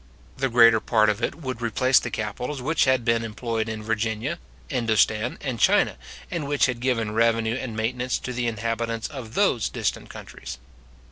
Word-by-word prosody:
The 135 - 0
greater 115 -2 +6
part 110 -1 +3
of 105 - -5
it - - -1
would 130 -6 -6
replace 130 +3 +3
the 120 - -5
capitals 120 +6 -4
which 150 +5 +1
had 130 -3 +2
been 115 -1 +2
employed 115 0 -3
in 110 -1 -5
Virginia, 110 0 -2 0.3
Indostan, 110 - +1
and 125 -5 -3
China, - - +4 0.4
and 155 -5 -3
which 145 0 +3
had 125 -2 -2
given 120 -4 0
revenue 115 0 +2
and 125 -3 -4
maintenance 125 +3 -1
to 125 - -6
the 120 0 -1
inhabitants 115 0 -2
of 125 -6 -8
those 160 - +2
distant - - -3
countries. - - -9
115 Hz, 175 wpm, -24 LUFS, 110-125 Hz, 0.4 s, greater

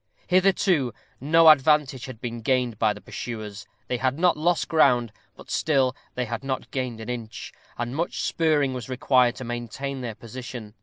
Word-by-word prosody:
Hitherto 180 - +2 0.2
no 165 +4 +5
advantage 150 -3 +5
had 130 -4 -9
been 120 -1 -5
gained 125 -2 0
by 110 -2 +3
the 105 0 -7
pursuers; 110 -3 -7 0.2
they 125 - -1
had 130 +2 0
not 180 +1 +3
lost 170 +3 +1
ground, 125 -8 +3 0.2
but - - -13
still 135 -4 +2 0.2
they 125 - -1
had 115 +2 -5
not 135 -1 -4
gained 125 -4 -3
an 110 - -8
inch, 115 -3 -6 0.2
and 120 +2 -3
much 170 +3 -2
spurring 150 -5 +1
was 125 -1 -6
required 125 -1 +3
to - - -7
maintain 120 +3 -5
their 115 -3 -5
position. 120 -2 -8
130 Hz, 170 wpm, -25 LUFS, 120-145 Hz, 0.2 s, no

